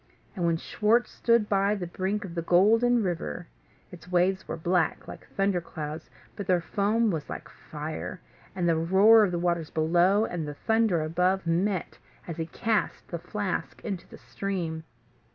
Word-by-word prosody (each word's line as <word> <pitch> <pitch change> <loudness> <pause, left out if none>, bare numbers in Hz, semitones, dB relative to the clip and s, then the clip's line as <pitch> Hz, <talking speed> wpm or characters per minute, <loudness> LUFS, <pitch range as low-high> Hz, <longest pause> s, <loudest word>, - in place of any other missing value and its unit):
And 175 -3 0
when 165 -1 +2
Schwartz 220 +7 +1
stood 230 -3 +2
by 200 0 +2
the 190 -4 -4
brink 190 +4 -2
of 175 - -8
the 170 - -2
Golden 225 +8 +4
River, 175 -1 -3 0.5
its 180 0 -12
waves 185 +2 +2
were - - -4
black, 175 +2 0
like - - -10
thunder 195 -2 +2
clouds, 155 -1 -7 0.3
but 200 -3 -6
their 180 -1 +3
foam 210 +5 +1
was 155 -4 -4
like - - -6
fire; 155 +4 -7 0.4
and 180 -2 0
the 165 - +3
roar 195 +7 +6
of 205 - +2
the 175 - -1
waters 170 -2 -1
below, 175 +6 +3
and 165 -7 -4
the 145 - -6
thunder 220 -4 +1
above, 180 +4 +1
met, 180 +2 -1 0.3
as 170 -2 -5
he 165 -1 -3
cast 220 +5 -1
the 170 - -4
flask 205 +2 -3
into 195 -5 -4
the - - -12
stream. 170 -5 -4
180 Hz, 170 wpm, -27 LUFS, 170-205 Hz, 0.5 s, roar